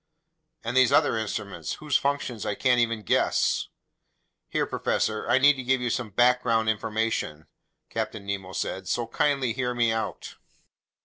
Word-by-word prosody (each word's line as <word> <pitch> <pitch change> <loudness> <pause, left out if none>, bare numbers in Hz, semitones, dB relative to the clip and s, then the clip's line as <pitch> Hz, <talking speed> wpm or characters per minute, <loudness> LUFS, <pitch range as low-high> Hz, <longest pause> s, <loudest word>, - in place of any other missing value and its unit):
"And 115 +2 -3
these 130 -2 +5
other - - +4
instruments, 110 -2 -4
whose 150 -3 -3
functions 140 -6 0
I 105 - -2
can't 125 +1 +2
even 115 -2 0
guess?" - - +1 0.8
"Here, - - 0
professor, 110 +1 -1
I 120 - +5
need 140 +1 +5
to 130 - -5
give 130 +1 +2
you 125 -1 -1
some 120 -2 -2
background 120 0 +3
information," 110 -8 -2 0.4
Captain 105 -3 -4
Nemo 95 -2 -4
said. 95 0 -3
"So 120 - 0
kindly 130 +1 0
hear 125 0 -2
me 120 -2 +2
out." 110 0 -4
115 Hz, 150 wpm, -26 LUFS, 110-125 Hz, 0.8 s, these